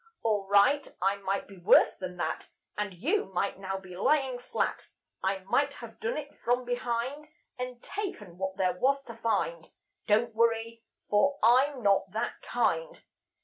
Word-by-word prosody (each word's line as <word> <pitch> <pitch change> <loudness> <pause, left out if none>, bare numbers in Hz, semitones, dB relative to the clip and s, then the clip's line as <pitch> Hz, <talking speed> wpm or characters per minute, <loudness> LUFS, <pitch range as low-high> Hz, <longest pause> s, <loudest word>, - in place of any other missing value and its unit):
All 210 -3 +1
right, 225 +9 +4
I 195 +2 +2
might 195 0 -2
be 195 -2 -13
worse 175 - +6
than 180 -1 -6
that; 175 - -3 0.3
And 210 0 -2
you 320 - +1
might 190 +2 -1
now 195 0 -3
be 185 -2 -10
lying 260 +4 +2
flat; 245 - -2 0.3
I 190 0 -1
might 195 - +1
have - - -10
done 475 +2 -2
it - - -6
from 245 +1 +1
behind, 245 +4 -2 0.3
And 250 -1 -5
taken 210 - -6
what 190 0 -3
there 185 -2 +2
was 275 +9 +1
to 230 -4 -10
find. 170 -8 -1 0.4
Don't 220 +2 +3
worry, 230 0 +1 0.3
for 280 +8 +3
I'm 255 +3 +4
not 195 -1 +3
that 220 +2 -3
kind. - - 0
225 Hz, 160 wpm, -29 LUFS, 195-255 Hz, 0.4 s, worse